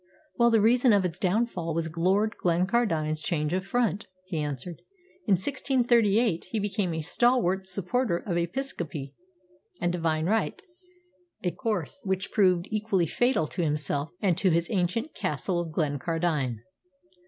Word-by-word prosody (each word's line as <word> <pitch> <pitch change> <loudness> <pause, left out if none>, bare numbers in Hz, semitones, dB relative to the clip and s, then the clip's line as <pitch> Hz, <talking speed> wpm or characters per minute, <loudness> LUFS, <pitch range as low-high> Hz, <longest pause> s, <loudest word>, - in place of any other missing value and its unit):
"Well, 235 0 +4
the 225 -2 +4
reason 240 +2 +5
of 200 -2 +3
its 170 - -3
downfall 185 -4 0
was 165 -1 -2
Lord 195 +6 +2
Glencardine's 170 -4 +1
change 155 -3 -1
of 185 0 0
front," 205 -1 0 0.2
he 175 -4 -3
answered. 150 +3 -5 0.5
"In 205 - +4
1638 235 -3 +2
he 185 - -4
became 200 -2 -1
a 160 - -2
stalwart 190 -1 +2
supporter 195 +2 0
of 175 0 -4
Episcopacy 170 - -3 0.7
and 175 - 0
Divine 160 -2 0
Right, 220 - 0 0.8
a 180 - +1
course 220 - -3
which 190 -1 -2
proved 185 -4 +3
equally 210 -4 +1
fatal 240 - +1
to 175 - -2
himself 150 -1 -1
and 185 -4 +3
to 190 - +3
his 170 0 +1
ancient 210 - -1
Castle 175 +5 -2
of 170 -2 -4
Glencardine. 150 -5 -1
180 Hz, 140 wpm, -27 LUFS, 165-220 Hz, 0.8 s, reason